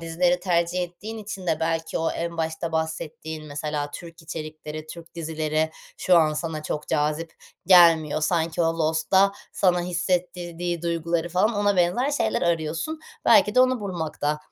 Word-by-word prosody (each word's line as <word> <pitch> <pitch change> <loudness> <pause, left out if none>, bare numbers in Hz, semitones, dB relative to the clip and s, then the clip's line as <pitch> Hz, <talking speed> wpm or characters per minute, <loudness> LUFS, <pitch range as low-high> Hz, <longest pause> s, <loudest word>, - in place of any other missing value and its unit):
dizileri 175 +2 +1
tercih 175 0 +1
ettiğin 210 +6 -7
için 195 -3 -7
de 160 -1 0
belki 165 0 -1
o 165 - 0
en 170 0 -4
başta 160 0 -3
bahsettiğin 160 -1 -4
mesela 145 0 -3
Türk 165 +2 -10
içerikleri, 155 -1 -7
Türk 170 0 -11
dizileri 160 -1 -1 0.3
şu 180 - +4
an 155 -1 +3
sana 155 0 -4
çok 150 0 -4
cazip 155 +2 0 0.3
gelmiyor. 165 -4 +6
Sanki 165 +1 +1
o 165 0 0
Lost'ta 165 +5 +3 0.2
sana 180 -2 +2
hissettirdiği 175 -1 -2
duyguları 170 0 -1
falan 185 +6 +2
ona 205 -1 +2
benzer 180 +11 +2
şeyler 220 -6 0
arıyorsun. 170 - -1 0.2
Belki - - +5
de 255 - +6
onu 255 -1 +3
bulmakta, 160 -6 -2
165 Hz, 150 wpm, -24 LUFS, 160-180 Hz, 0.3 s, gelmiyor